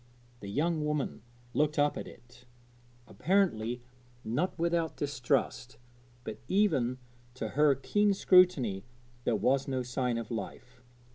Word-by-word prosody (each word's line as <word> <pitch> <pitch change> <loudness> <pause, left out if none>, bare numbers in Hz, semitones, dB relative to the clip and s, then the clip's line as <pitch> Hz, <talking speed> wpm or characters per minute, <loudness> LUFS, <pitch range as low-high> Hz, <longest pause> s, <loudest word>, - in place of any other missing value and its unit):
The 100 - -8
young 155 +7 0
woman 150 -6 -2 0.3
looked 150 +1 +1
up 145 0 +3
at - - -6
it, 125 +1 -16 0.6
apparently 125 - 0 0.4
not 140 +12 -1
without 170 -1 0
distrust, 135 -3 -1 0.5
but 105 - -6
even 145 - +2 0.4
to - - -4
her 150 0 +4
keen 205 +10 +1
scrutiny 165 - +4 0.4
there - - +2
was 135 +1 +1
no 130 -2 -1
sign 125 -1 -1
of 115 -1 -6
life. 125 +3 -7
135 Hz, 125 wpm, -30 LUFS, 120-160 Hz, 0.6 s, her